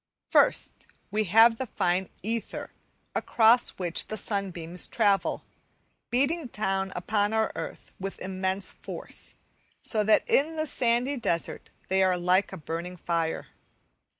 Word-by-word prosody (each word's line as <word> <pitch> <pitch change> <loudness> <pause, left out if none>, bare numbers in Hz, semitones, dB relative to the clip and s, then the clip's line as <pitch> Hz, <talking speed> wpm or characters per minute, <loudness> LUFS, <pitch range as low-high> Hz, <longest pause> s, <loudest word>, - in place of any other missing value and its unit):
First, - - +2 0.2
we 215 +1 +1
have 225 +4 +6
the 260 - -2
fine 180 -2 0
ether 225 +2 -3 0.4
across 230 +1 +4
which 175 -2 0
the 215 - -4
sunbeams 180 -5 -2
travel, 200 -1 +1 0.7
beating 280 +5 +1
down 195 -3 -1
upon 205 +3 0
our 220 0 +1
earth - - -7
with 195 +1 -5
immense 190 0 -2
force, - - -6 0.5
so 215 -2 +2
that 215 +1 +4
in 310 +4 +3
the 310 0 -1
sandy 250 0 +1
desert 170 -8 -2 0.2
they 190 +1 +2
are 185 -1 +3
like 180 +2 +2
a 190 - -6
burning 170 +3 -5
fire. 165 -1 -2
200 Hz, 130 wpm, -28 LUFS, 180-230 Hz, 0.7 s, have